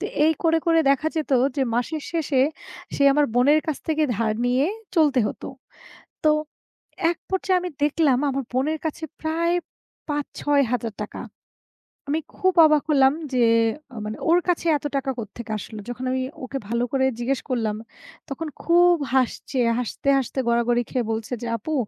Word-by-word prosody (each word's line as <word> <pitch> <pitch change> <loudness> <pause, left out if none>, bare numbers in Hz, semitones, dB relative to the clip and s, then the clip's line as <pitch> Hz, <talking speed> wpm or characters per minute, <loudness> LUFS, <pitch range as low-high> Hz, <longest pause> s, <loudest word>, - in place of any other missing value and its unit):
তো 405 - -4 0.2
এই 320 - +5
করে, 325 0 +3
করে 330 -1 +4
দেখা 295 +3 +2
যেত 310 -2 -2 0.3
যে 270 - +2
মাসের 290 +5 -1
শেষে, 300 -6 +1 0.5
সেই 280 - +3
আমার 295 0 +3
বোনের 285 +5 +5
কাছ 310 - -1
থেকে 310 0 +1
ধার 220 -1 0
নিয়ে 255 +4 +2 0.3
চলতে 290 -6 +4
হত। - - -8 0.8
তো 305 - +6 0.8
এক 345 - -6
পর্যায়ে 375 -1 +1
আমি 360 - -4
দেখলাম 295 -4 +3
আমার 275 0 -2
বোনের 300 +5 0
কাছে 315 +1 -4 0.2
প্রায় 335 +2 0 0.5
৳৫০০০-৬০০০ 250 -7 -1 0.9
আমি 310 +2 +1 0.2
খুব 375 0 +2
অবাক 305 -2 +4
হলাম 270 -2 +5 0.2
যে 245 -2 +4 0.5
আ - - -11
মানে 215 - -5
ওর 345 - +6
কাছে 345 -1 0
এত 290 - -13
টাকা 270 0 0
কোত্থেকে 225 +1 -7
আসলো? 215 +1 -8
যখন 245 +1 -6
আমি 260 0 0 0.2
ওকে 270 +2 -4
ভালো 235 +2 0
করে 265 -1 +2
জিজ্ঞেস 260 +2 -1
করলাম, 225 -4 0 0.5
তখন 310 +4 -4 0.2
খুব 350 +1 +5 0.2
হাসছে। 260 +1 0 0.2
হাসতে, 250 +3 -2
হাসতে 265 0 -2
গড়াগড়ি 235 +1 +2
খেয়ে 245 -3 -1
বলছে 220 +2 -3
যে 240 - -4
"আপু 310 +8 -5
275 Hz, 160 wpm, -23 LUFS, 245-315 Hz, 0.9 s, তো